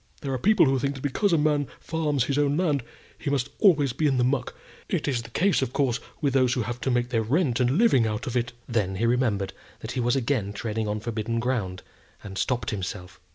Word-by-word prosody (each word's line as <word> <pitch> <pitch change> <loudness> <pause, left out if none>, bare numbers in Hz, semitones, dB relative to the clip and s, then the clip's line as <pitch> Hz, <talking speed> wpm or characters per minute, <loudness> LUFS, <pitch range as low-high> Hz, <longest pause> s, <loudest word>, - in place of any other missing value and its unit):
There 135 -1 -3
are 130 - -1
people 210 - +5
who 135 -1 +2
think 140 +2 -1
that 135 - -8
because 180 +8 +1
a 165 - +4
man 150 -2 +2
farms 150 -5 0
his 140 +3 0
own 145 0 +2
land, 155 -6 +1 0.4
he - - -3
must 140 -1 0
be - - 0
always 150 -8 +5
in 135 +1 +1
the 125 - +3
muck. 130 0 0 0.3
It - - -1
is 130 -5 0
the 115 - -11
case, 185 +9 +2
of 130 -1 -2
course, 130 -3 +1 0.2
with 140 -4 +1
those 130 -2 +3
who 125 - 0
have 120 +3 -5
to - - -1
make 120 -1 +1
their 115 -3 +1
rent 130 +2 +1
and 125 +4 +2
living 160 - +4
out 105 +2 -3
of 125 - -4
it." 120 0 0 0.2
Then 105 -5 0
he 110 +5 0
remembered 115 -5 +1 0.3
that - - -5
he 130 - -3
was 120 +1 +2
again 115 -6 0
treading 110 +1 -3
on 105 0 -2
forbidden 115 0 -2
ground, 110 -7 -2 0.4
and 95 - -8
stopped 125 +5 -1
himself. 90 -3 -5
125 Hz, 240 wpm, -26 LUFS, 115-140 Hz, 0.4 s, people